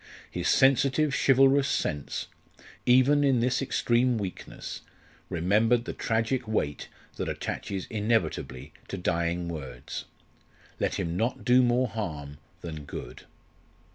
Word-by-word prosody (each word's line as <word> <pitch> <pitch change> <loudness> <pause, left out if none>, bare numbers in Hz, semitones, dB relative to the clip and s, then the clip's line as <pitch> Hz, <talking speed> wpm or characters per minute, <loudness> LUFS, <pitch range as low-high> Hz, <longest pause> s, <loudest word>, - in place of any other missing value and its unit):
His - - -2
sensitive 135 +2 +4
chivalrous 135 +1 +5
sense, 75 - -2 0.6
even 130 +4 +5
in 135 -3 +3
this 125 +3 +1
extreme 125 -2 +2
weakness, 95 -4 -6 0.5
remembered 110 +8 +2
the - - -4
tragic 115 +2 -1
weight 75 -9 -1 0.3
that - - -2
attaches 95 -2 -4
inevitably 105 - -1
to 100 - -5
dying 85 -1 -1
words. 70 -7 -6 0.7
Let - - 0
him 85 0 -2
not 115 +6 -1
do 125 +1 +6
more 125 +1 +3
harm 75 -10 -5 0.2
than 80 -4 -7
good. 65 -2 -8
110 Hz, 115 wpm, -28 LUFS, 85-130 Hz, 0.7 s, do